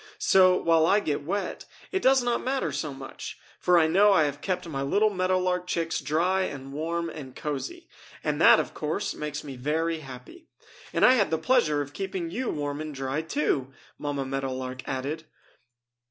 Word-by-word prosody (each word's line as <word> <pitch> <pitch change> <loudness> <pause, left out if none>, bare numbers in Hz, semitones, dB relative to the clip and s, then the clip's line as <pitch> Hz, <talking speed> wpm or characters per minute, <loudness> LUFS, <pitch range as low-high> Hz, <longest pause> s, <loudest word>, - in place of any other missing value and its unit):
So, 185 -1 +5
while 165 -1 +3
I 205 - +5
get 150 -9 -2
wet, 195 +6 -3 0.3
it 380 - 0
does 265 -1 +4
not 240 -1 0
matter 265 +1 -1
so 150 - -3
much, 135 0 -8 0.2
for 180 -1 +4
I 165 - +5
know 195 +6 +5
I 160 - +5
have 145 -1 -2
kept 180 -2 -2
my 135 -4 -3
little 205 +10 +2
Meadow 185 -1 +1
Lark 180 -1 -1
chicks 165 -2 -1
dry 170 +6 +1
and 135 -6 -5
warm 170 +3 -2
and 140 -6 -8
cozy 150 - -5 0.4
and - - -1
that, - - +8
of - - -3
course, - - -2
makes 150 0 -5
me 140 -3 -8
very 160 +5 -1
happy! 135 - -11 0.4
And - - +4
I 250 - +8
had 215 -6 +2
the 160 - +1
pleasure 155 - +2
of 145 +1 -12
keeping 190 -4 -4
you 250 +6 -2
warm 145 0 -3
and 155 -2 -6
dry, 135 +3 -2
too!" 145 - -1 0.3
Mamma 145 -2 -2
Meadow 135 0 -2
Lark 130 0 -5
added. 140 +5 -3
160 Hz, 190 wpm, -27 LUFS, 140-185 Hz, 0.4 s, that